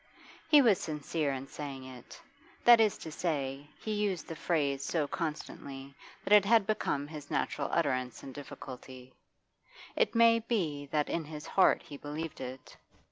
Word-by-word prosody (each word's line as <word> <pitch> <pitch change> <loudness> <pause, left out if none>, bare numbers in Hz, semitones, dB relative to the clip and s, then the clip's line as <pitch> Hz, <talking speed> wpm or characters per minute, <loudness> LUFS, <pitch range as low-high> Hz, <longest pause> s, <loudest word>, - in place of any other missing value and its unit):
He 295 -3 +8
was 215 -6 +5
sincere 150 -1 -2
in 135 0 -4
saying 140 -2 -7
it; 130 -2 -11 0.4
that 240 -1 +8
is 215 -2 +3
to 160 - -8
say, 145 -4 -2
he 215 - -3
used 205 -4 -1
the 165 - -6
phrase 145 -4 0
so 150 0 0
constantly 140 -3 -5 0.3
that 205 - +2
it 210 -2 +8
had 220 0 +4
become 170 -9 -1
his 150 -2 -9
natural 140 - -1
utterance 130 -7 0
in 135 - -7
difficulty; 130 -2 -10 0.8
it 485 - +1
may 230 0 +6
be 170 -11 -2
that 150 +1 0
in 165 -2 -2
his 150 0 -8
heart 190 - +4
he 145 - -9
believed 150 +2 -6
it. 130 0 -8
150 Hz, 160 wpm, -31 LUFS, 140-190 Hz, 0.8 s, He